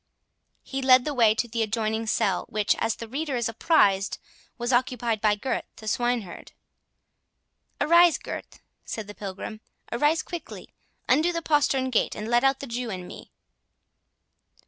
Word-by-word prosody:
He 270 0 -4
led 255 -1 +6
the 300 - -2
way 225 -5 +4
to 240 - -1
the 230 0 -2
adjoining 220 0 -1
cell, 195 -3 0
which, 210 -1 +1
as 225 -1 0
the 230 - -8
reader 280 +3 -3
is 235 -2 0
apprised, 210 - +2 0.4
was 240 +1 -1
occupied 240 -3 0
by 210 -1 +3
Gurth 255 +5 -3
the 220 - -11
swineherd.—"Arise, 245 - -1
Gurth," - - -8 0.2
said 220 - -5
the 205 - -9
Pilgrim, 205 +2 -7 0.3
"arise 295 +6 +2
quickly. 340 -2 -8 0.3
Undo 310 +7 +3
the 335 -1 -3
postern 275 -4 +2
gate, 235 - +1
and 210 - -5
let 240 +2 +3
out 270 0 +2
the - - -5
Jew 240 -1 -4
and 185 -3 -6
me." - - -11
240 Hz, 150 wpm, -26 LUFS, 215-270 Hz, 0.4 s, led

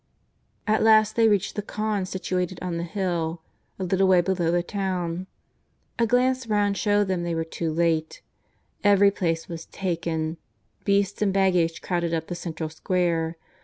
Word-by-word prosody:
At 215 0 +2
last 215 -1 +5
they 230 -1 +5
reached 205 -2 +1
the 210 - -1
khan, 210 -2 -2
situated 185 -1 -2
on 180 -2 -3
the 170 - -2
hill, 170 -3 -2 0.3
a 190 - -4
little 190 +1 +2
way 185 -1 +6
below 175 -1 +1
the 175 +1 +2
town. 185 -2 -3 0.7
A 230 - +3
glance 255 +1 +2
round 205 -2 +1
showed 205 0 +2
them 190 -3 -1
they 170 -1 -2
were 165 - 0
too 165 0 -3
late. 160 -1 0 0.6
Every 200 0 +5
place 165 -4 -1
was 165 -2 -7
taken. 165 -3 -2 0.5
Beasts 200 0 +1
and 205 -2 +3
baggage 180 -4 +2
crowded 170 -2 -1
up 160 0 -4
the - - -2
central 165 -2 -5
square. 165 0 0
180 Hz, 165 wpm, -25 LUFS, 170-200 Hz, 0.7 s, way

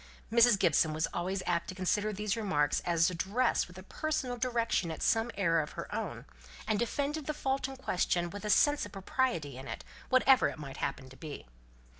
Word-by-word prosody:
Mrs. 235 -1 +6
Gibson 160 -4 +3
was 160 +1 0
always 185 +2 -2
apt 170 -1 0
to 185 - -6
consider 205 +3 0
these 210 0 -2
remarks 190 -10 +1
as 170 0 +3
addressed 200 +8 +1
with 180 +1 -14
a 185 - -9
personal 270 0 -2
direction 235 -7 0
at 160 - -5
some 225 +1 +2
error 165 -4 +3
of 150 - -7
her - - -7
own, - - -4 0.4
and 215 -2 +1
defended 285 +5 -2
the 305 - -2
fault 270 -2 -1
in 270 0 -8
question 175 -7 0
with 205 +1 -7
a 210 - -3
sense 290 +6 +4
of - - -7
property 190 - -1
in 135 - -9
it, - - -6 0.3
whatever 260 0 +5
it - - -5
might 140 -3 -8
happen 130 - -3
to 130 - -14
be. 155 -3 -8
200 Hz, 200 wpm, -31 LUFS, 170-250 Hz, 0.4 s, Mrs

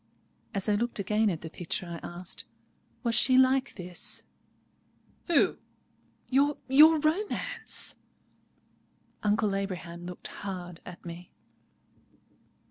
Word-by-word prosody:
As 195 +1 -2
I 210 - +3
looked 235 +4 0
again 210 +2 +2
at 170 -4 -3
the 160 - -6
picture, 175 +1 -3
I 170 -1 -6 0.2
asked, 180 0 -7 0.6
"Was 235 -2 +1
she 255 +2 +5
like 260 +1 +4
this?" 180 -2 -4 1.0
"Who?" 340 - +3 0.7
"Your—your 285 +3 +5
romance!" 315 +8 0 1.2
Uncle 210 -1 +2
Abraham 175 -3 -4
looked 180 - -7
hard 180 -3 -6
at 180 0 -10
me. 170 +1 -8
205 Hz, 105 wpm, -29 LUFS, 180-260 Hz, 1.2 s, she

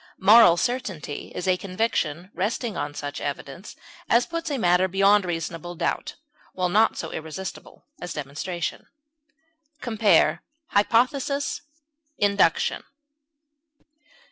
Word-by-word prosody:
Moral 195 -3 +7
certainty 190 - -3
is 180 - -4
a 185 -1 +3
conviction 185 -3 -2
resting 210 +4 -2
on 145 0 -4
such 145 0 -5
evidence 145 +5 -6 0.3
as 235 +1 +4
puts 335 -1 -4
a 285 - -1
matter 180 -3 +3
beyond 195 +1 +4
reasonable 170 0 -4
doubt, 305 - -2 0.4
while 180 -1 -1
not 215 +5 +3
so 160 - -5
irresistible 160 +4 -7 0.2
as 175 - -5
demonstration. 150 +4 -5 0.9
Compare 220 -5 +3 0.3
HYPOTHESIS; 255 +7 +1 0.6
INDUCTION. 200 -5 +2
190 Hz, 105 wpm, -24 LUFS, 170-225 Hz, 0.9 s, Moral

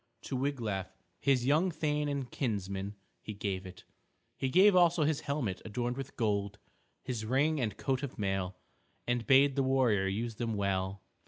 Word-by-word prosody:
To 135 - -4
Wiglaf, 120 -8 -1 0.3
his 130 -3 +2
young 155 +7 +3
thane 150 -2 -1
and 140 -3 -3
kinsman, 100 -4 -3 0.3
he 105 - -7
gave 95 -2 -3
it. 90 0 -12 0.5
He 130 - -1
gave 190 +6 +6
also 175 -2 +5
his 150 -1 +1
helmet 135 -10 -2
adorned 120 +3 -2
with 135 0 -7
gold, 100 -3 0 0.5
his 125 -4 -3
ring 140 +6 +2
and 105 -5 -2
coat 135 -1 -1
of 140 -3 -5
mail, 95 -2 -1 0.5
and 120 -2 -1
bade 135 0 +6
the 140 - +2
warrior 130 -7 +2
use 110 +3 -3
them 115 -2 -2
well. 95 -1 -1
120 Hz, 165 wpm, -32 LUFS, 100-140 Hz, 0.5 s, gave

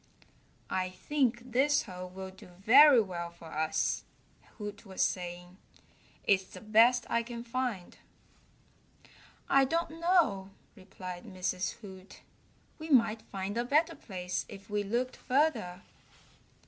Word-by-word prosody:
"I 185 0 0
think 245 +4 -1
this 280 +4 +3
hole 185 -3 -8
will 190 +1 -8
do 190 - -15
very 240 +10 +7
well 175 -5 -3
for 170 -1 -13
us," 155 +1 0 0.5
Hoot 205 -1 -7
was 190 -3 -1
saying. 180 0 -4 0.7
"It's 190 -1 +3
the - - -12
best 230 +3 +4
I 235 - +1
can 235 0 -7
find." 240 -6 -3 1.5
"I 275 0 +5
don't 330 +3 -1
know," 335 - +2 0.3
replied 185 -2 -9
Mrs. 185 0 -2
Hoot. 190 -2 -12 0.6
"We 315 +1 -7
might 230 -5 +4
find 200 +3 -4
a - - +1
better 300 +6 +2
place 180 -3 -4
if 200 0 -12
we 210 0 +1
looked 240 +5 -2
further." 255 - 0
205 Hz, 125 wpm, -31 LUFS, 185-250 Hz, 1.5 s, very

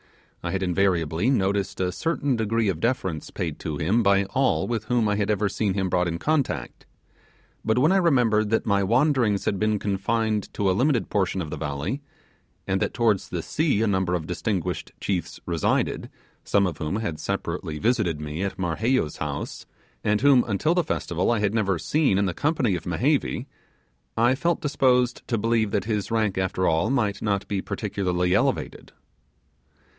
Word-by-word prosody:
I - - -3
had 95 +2 -1
invariably 90 - +1
noticed 100 -5 0
a 90 -1 0
certain 145 - -1
degree 115 0 0
of 85 -4 -2
deference 95 - -1
paid 80 -4 -4
to 80 -3 -4
him 95 +10 +2
by 100 -2 +4
all 135 0 +1
with 115 -2 -2
whom 120 -1 +1
I 105 - +1
had 100 0 -1
ever 105 -1 +1
seen 100 -1 -1
him 95 -2 0
brought 90 0 +1
in 85 -1 -2
contact; 130 - -2 0.8
but 110 +1 +1
when 150 +7 +4
I 195 - +4
remembered 120 - +3
that 110 - +1
my 100 -2 +2
wanderings 120 -1 +2
had 100 - 0
been 110 0 +1
confined 105 +2 -1
to 100 - 0
a 95 - +4
limited 125 +3 +1
portion 95 -2 0
of 75 - -8
the - - -4
valley, 80 - -3 0.6
and 95 0 0
that - - -1
towards 110 -5 +1
the 85 -3 -3
sea 150 -9 +1
a - - +2
number 95 -3 +1
of 80 -3 -3
distinguished 90 +1 -3
chiefs 90 -4 -3
resided, 85 -2 0 0.3
some 100 0 +2
of 85 -5 -3
whom 75 +5 -2
had 105 -8 -3
separately 85 -2 -3
visited 105 -6 +1
me 75 +2 -5
at 100 0 -3
Marheyo's 95 - 0
house, 75 -1 -5 0.4
and 105 0 +1
whom, 140 -3 +6
until 120 +10 +1
the 175 -1 +2
Festival, 90 - -1
I 120 - +2
had 105 -1 0
never 100 -5 +1
seen 140 - +1
in 100 - +2
the 90 - -1
company 145 - +1
of 85 -2 -4
Mehevi, 125 - 0 0.7
I 120 +3 +4
felt 170 +5 0
disposed 125 -4 +2
to 115 - 0
believe 110 0 +1
that 100 +1 -1
his 105 -3 -2
rank 110 -4 0
after 95 0 0
all 80 0 +2
might 110 -7 0
not 100 -2 -1
be 100 -2 -1
particularly 95 -4 -1
elevated. - - -1
100 Hz, 180 wpm, -25 LUFS, 90-115 Hz, 0.8 s, whom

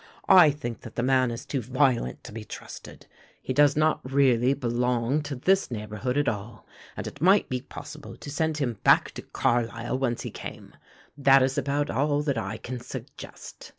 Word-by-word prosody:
I 180 -5 +8
think 120 -5 -5
that - - -11
the 120 - -1
man 130 -1 +3
is 115 0 -6
too 135 - -2
violent 125 - 0
to - - -10
be 110 0 -7
trusted. - - -10 0.3
He 130 - -4
does 145 +1 +4
not 155 +1 +2
really 130 -1 +3
belong 125 +2 0
to 145 -1 -5
this 190 +9 +2
neighbourhood 105 +2 -3
at 145 - +1
all 105 -1 -4 0.3
and - - -4
it 140 - -8
might 190 +4 +4
be 125 -1 -2
possible - - -10
to 145 - -9
send 160 +1 -1
him 120 -7 -2
back - - +5
to - - -8
Carlisle 120 +1 -1
whence 120 -3 -1
he - - -5
came. - - -9 0.5
That 135 -1 +6
is 130 0 0
about 145 +1 -1
all 145 +1 +1
that 140 -4 -1
I 105 0 -4
can 125 +2 -6
suggest. 125 - -10
130 Hz, 185 wpm, -26 LUFS, 120-145 Hz, 0.5 s, I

